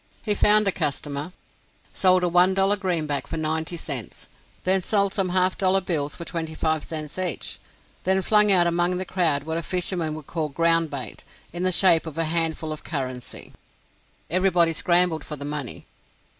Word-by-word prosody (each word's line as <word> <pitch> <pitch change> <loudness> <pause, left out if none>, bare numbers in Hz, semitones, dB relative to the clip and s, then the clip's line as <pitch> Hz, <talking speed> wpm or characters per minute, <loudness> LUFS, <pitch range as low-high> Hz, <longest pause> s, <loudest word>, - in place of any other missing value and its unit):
He 210 - +3
found 210 0 +4
a - - +4
customer; 145 +1 -3 0.6
sold 185 -1 +4
a - - +2
one 180 +2 +4
dollar 195 +1 +3
greenback 165 -8 -2
for - - -5
ninety 160 +2 -2
cents; 140 -9 -5 0.4
then 190 +1 +2
sold 200 0 +1
some 195 -3 0
half 185 +1 +1
dollar 190 0 +3
bills 150 -6 -1
for 170 - -8
twenty 160 -2 -5
five 155 -1 0
cents 155 +1 -6
each; 180 -5 -2 0.4
then 190 +1 +1
flung 210 +1 +4
out 180 -3 +5
among 175 +1 +1
the 185 - -4
crowd 165 -7 +1
what 160 +2 -3
a - - -4
fisherman 175 -2 -2
would 155 -2 -9
call 155 -1 -3
ground 165 +2 +2
bait, 140 -3 -6 0.3
in 175 - -5
the 185 0 +2
shape 170 -2 +4
of 160 -1 -8
a 165 - +1
handful 160 -1 -1
of 155 - -10
"currency." 130 -5 -5 0.7
Everybody 175 -2 +2
scrambled 175 -1 +3
for 150 - -6
the 140 0 -8
money. 145 -4 -5
170 Hz, 180 wpm, -24 LUFS, 155-185 Hz, 0.7 s, out